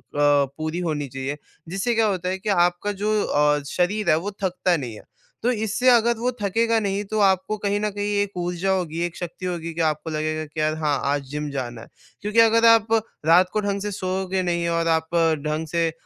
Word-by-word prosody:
पूरी 145 +3 +1
होनी 145 -2 -2
चाहिए। 135 +3 -5 0.3
जिससे 195 +6 -1
क्या 225 - +3
होता 185 -2 -1
है 190 - -1
कि 210 +2 -4 0.2
आपका 180 +4 -4
जो 215 0 +2
अ, 150 0 +2
शरीर 190 +2 0
है 155 - +5
वो 205 - -2
थकता 180 -1 +1
नहीं 125 -6 -5
है। - - -12 0.4
तो 245 - +3
इससे 220 +2 -1
अगर 235 -1 +4
वो 245 +2 0
थकेगा 225 +3 +2
नहीं 200 -1 -1
तो 215 - 0
आपको 190 +1 +2
कहीं 205 0 -1
न 210 - 0
कहीं 205 +1 -2
एक 200 -2 -4
ऊर्जा 175 +2 -1
होगी, 170 -3 -1
एक 175 - -6
शक्ति 175 +1 -6
होगी 170 -2 -3
कि 165 - -2
आपको 155 +1 -1
लगेगा 155 0 -2
कि 155 +1 -8
यार 155 0 +1
हाँ, 145 -2 +1
आज 140 0 0
जिम 150 0 -3
जाना 120 -4 -5
है। - - -12 0.3
क्योंकि 210 +3 +1
अगर 230 0 +5
आप 225 -1 +5 0.3
रात 180 +3 +5
को 215 - +1
ढंग 200 -1 -2
से 210 - -3
सोओगे 190 0 -2
नहीं 170 -1 0
और 165 0 0
आप 160 +1 0 0.3
ढंग 155 +1 -2
से 165 +1 0
180 Hz, 215 wpm, -23 LUFS, 155-205 Hz, 0.4 s, है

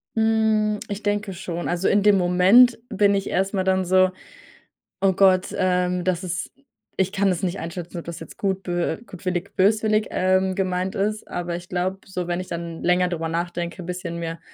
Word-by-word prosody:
Hm, 220 -1 +2
ich 205 0 -5
denke 205 -1 -1
schon. 175 -1 -5
Also, 175 +2 0
in 205 0 +3
dem 205 -2 +5
Moment 190 +8 +5
bin 205 -1 +3
ich 195 0 -1
erstmal 190 0 0
dann 190 0 +1
so: 185 +1 +4 0.9
„Oh 195 -1 +4
Gott, 185 -1 +3
ähm, 180 -1 +1
das 185 0 -1
ist 175 -2 -4 0.5
ich 190 0 +2
kann 200 -1 +1
des 185 +1 -1
nicht 185 +1 -1
einschätzen, 170 +1 -6
ob - - -10
das 170 0 -7
jetzt - - -11
gut, 195 -1 -1
bö 175 -1 -1
äh, - - -7
gutwillig, 185 +1 -4
böswillig, 215 +2 +2
ähm, 185 0 +1
gemeint 185 -1 -1
ist.“ 210 +2 -2
Aber 175 -1 -4
ich 175 0 -8
glaube 185 +2 -2
so, 180 -2 -4
wenn 175 0 -1
ich 185 - -6
dann 170 -1 -6
länger 180 +1 +3
drüber 165 -2 -3
nachdenke, 170 +1 -3
bisschen 175 -1 -5
mir 165 0 -5
185 Hz, 190 wpm, -23 LUFS, 175-200 Hz, 0.9 s, dem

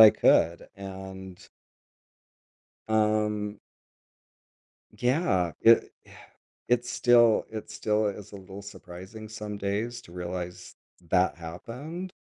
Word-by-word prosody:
I 110 -1 +12
could, 85 +1 +3
and 95 -1 -8 1.5
Um 105 -1 +1 1.4
Yeah, 125 - +2
it 115 0 +6
yeah, - - -18 0.6
it's 120 0 +2
still 120 -2 +5
it 110 -1 -7
still 105 0 +1
is 100 -1 -6
a - - -9
little 95 +1 -9
surprising 100 +2 -10
some 105 -1 -6
days 105 +4 -2
to 85 - -15
realize 90 0 -6 0.3
that 90 +1 +3
happened, 125 - -7
105 Hz, 105 wpm, -28 LUFS, 95-115 Hz, 1.5 s, I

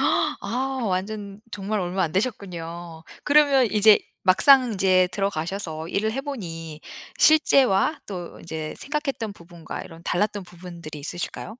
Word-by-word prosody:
아 265 +2 0
완전 200 +1 -3
정말 205 +1 -2
얼마 180 +1 -1
안 160 - -1
되셨군요. 175 -6 -4 0.2
그러면 285 -3 +5
이제 210 0 +7 0.2
막상 250 +6 +6
이제 185 -1 +3
들어가셔서 170 -4 -3
일을 215 +4 0
해보니 170 - -6 0.4
실제와 280 -4 +4
또 180 -4 -7
이제 160 -2 -6
생각했던 275 -7 -3
부분과 170 -3 -9
이런 165 0 -12
달랐던 205 +2 0
부분들이 170 -3 -10
있으실까요? 175 +7 -5
195 Hz, 300 characters per minute, -24 LUFS, 170-220 Hz, 0.4 s, 이제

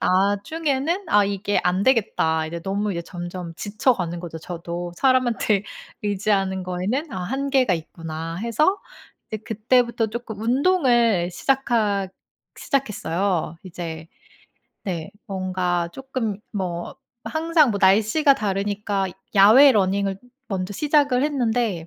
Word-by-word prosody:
나중에는 275 - 0
'아 205 -6 +5
이게 200 +1 0
안 185 +2 +1
되겠다.' 160 -10 +2
이제 170 +1 -5
너무 200 +2 -1
이제 170 - -2
점점 175 0 -7
지쳐가는 200 -3 0
거죠 170 -2 -7
저도. 175 +1 -6
'사람한테 240 -6 +2 0.4
의지하는 195 -2 0
거에는 210 - -2
'아 185 - -4
한계가 265 0 +1
있구나.' 165 0 -6
해서 235 - +1 0.5
이제 220 - -3
그때부터 235 0 +1
쪼끔 220 -2 -6
운동을 240 - +2
시작하 215 -5 0 0.5
시작했어요. 195 - -1
이제 165 -3 -7 0.8
네 170 -5 -4 0.2
뭔가 185 -3 -1
쪼끔 255 -5 -4
뭐 180 -4 -4 0.3
항상 315 -3 +2
뭐 200 - -2
날씨가 220 +10 +4
다르니까 200 -1 -1 0.3
야외 225 +9 +8
러닝을 195 -1 +1 0.3
먼저 190 0 -3
시작을 285 -1 +2
했는데 235 - 0
205 Hz, 265 characters per minute, -23 LUFS, 180-250 Hz, 0.8 s, 야외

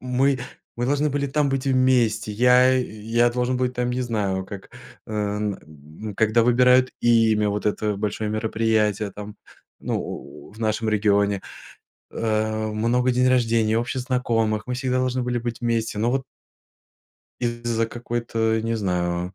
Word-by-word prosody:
мы 130 +2 +1 0.4
мы 120 +1 -1
должны 145 +2 +1
были 140 0 -1
там 140 +1 +1
быть 135 0 -2
вместе, 125 -5 +2
я, 125 +3 +5
э, - - +1
я 115 +1 0
должен 125 +1 -1
быть, 125 0 -1
там, 125 0 -1
не 125 +1 -2
знаю, 100 -6 -2
как, 100 -1 -9 0.4
э, 105 -1 -2 0.8
когда 110 +1 +3
выбирают 125 +1 +4
имя, 110 -3 +3
вот 105 +1 -3
это 105 0 0
большое 105 +1 -2
мероприятие, 110 -1 0
там, 105 0 -9 0.4
ну, - - -2
у - - -9
в 110 - -16
нашем 110 0 -1
регионе, 100 -2 +2 0.7
э, 110 -1 -1
много 120 +4 +1
день 125 +1 +2
рождений, 115 -3 +2
общих 120 +3 -1
знакомых, 115 -4 0
мы 125 - -2
всегда 130 0 -1
должны 130 0 0
были 120 0 -1
быть 120 0 -4
вместе, 115 -2 -1
ну 115 +3 +1
вот. 135 0 0 1.2
Из-за 120 -1 -1
какой-то, 115 -1 -2
не 115 0 -1
знаю, 90 -2 -2
115 Hz, 150 wpm, -23 LUFS, 110-125 Hz, 1.2 s, я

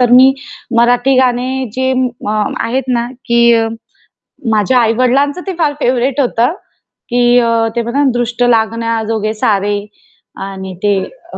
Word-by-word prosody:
तर 245 -1 +3
मी 260 +2 +7 0.5
मराठी 245 +3 +3
गाणे 255 +1 0
जे 260 0 0
अ, - - 0 0.3
म 210 0 -1
आहेत 255 +3 -1
ना, 235 0 0 0.2
की 235 -1 +3 0.8
माझ्या 220 +4 +2
आई-वडिलांचं 255 +7 +1
ते 385 - -2
फार 300 -3 +1
फेव्हराइट 255 +2 +1
होतं 245 0 +1 0.6
की 245 0 +3
अ, 230 -1 +1
ते 235 - +1
बघा 235 +5 -2
ना, 275 - +3
दृष्ट 240 0 -1
लागण्याजोगे 225 -2 0
सारे. 205 -1 0 0.7
आणि 190 -1 -7
ते 205 - +3 0.4
अ, - - -6
240 Hz, 140 wpm, -14 LUFS, 225-255 Hz, 0.8 s, मी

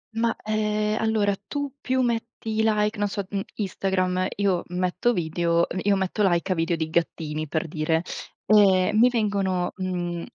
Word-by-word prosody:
Ma, 230 0 +1
ehm, 215 0 0
allora 215 -3 +2
tu 285 -2 -3
più 260 0 +1
metti 230 -2 -2
i - - +5
like 210 -1 +1
non 205 - +2
so, 200 0 -4
uhm, 200 0 -2
Instagram, 185 -2 0
io 195 -3 +1
metto 180 +6 0
video 170 -2 +1
uhm, 185 - -4
io 200 0 +3
metto 190 +2 -1
like 175 +2 0
a - - +2
video 165 +1 0
di 160 -1 -2
gattini, 155 -2 -1
per 160 +3 -2
dire. 160 +1 0 0.4
Ehm, 200 -2 +5
mi 245 +2 +7
vengono, 195 -6 0
mhmm 175 -2 -3
195 Hz, 170 wpm, -25 LUFS, 175-215 Hz, 0.4 s, mi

